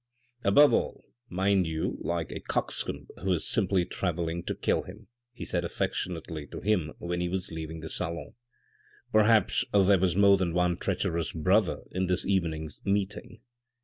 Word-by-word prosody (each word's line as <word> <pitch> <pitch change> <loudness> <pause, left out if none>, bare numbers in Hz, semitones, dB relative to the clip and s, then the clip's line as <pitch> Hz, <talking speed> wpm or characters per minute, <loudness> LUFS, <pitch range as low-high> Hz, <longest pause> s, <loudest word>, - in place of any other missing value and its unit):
" 125 0 -37
Above 145 +7 +7
all, - - -1 0.2
mind 95 0 +2
you 80 0 -1
look - - -8
like 85 -2 -2
a - - -5
coxcomb - - -2 0.2
who 95 -1 +2
is 85 - -2
simply 95 -4 +1
travelling 85 -2 -2
to - - -3
kill - - +1
time," 100 +4 -12 0.3
he 125 - -8
said 90 -1 -1
affectionately 80 -3 -3
to - - -7
him 90 -8 0
when 90 0 -3
he 90 - -1
was 95 0 -3
leaving 80 0 -6
the 80 - -6
salon. 85 -2 -4 0.4
" - - -31
Perhaps 110 -1 +4
there 100 -1 +5
was 90 -2 +1
more 100 0 +6
than 90 -3 -1
one 90 0 +2
treacherous 85 0 -1
brother 80 -2 +2
in 95 0 -1
this 90 0 +1
evening's 80 -6 -1
meeting." 100 +2 -2
90 Hz, 175 wpm, -28 LUFS, 85-100 Hz, 0.4 s, Above